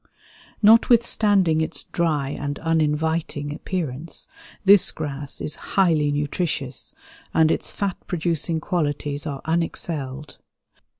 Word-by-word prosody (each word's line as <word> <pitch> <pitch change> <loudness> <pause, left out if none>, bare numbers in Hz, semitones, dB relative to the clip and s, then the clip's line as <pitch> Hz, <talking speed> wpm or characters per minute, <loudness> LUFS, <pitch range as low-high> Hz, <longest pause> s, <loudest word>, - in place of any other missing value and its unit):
Notwithstanding 210 -6 +4
its 160 - -3
dry 155 -5 -1
and 145 0 -4
uninviting 160 -2 -1
appearance, 160 -2 -4 0.4
this 200 0 +7
grass 145 -2 -5
is 150 - -2 0.2
highly 160 -6 +3
nutritious, 145 -2 -2 0.4
and 160 0 +5
its - - -1
fat 200 -3 -3
producing 170 -2 -1
qualities 145 -3 -2
are 140 -2 -5
unexcelled. 155 -4 -3
160 Hz, 100 wpm, -23 LUFS, 145-170 Hz, 0.4 s, this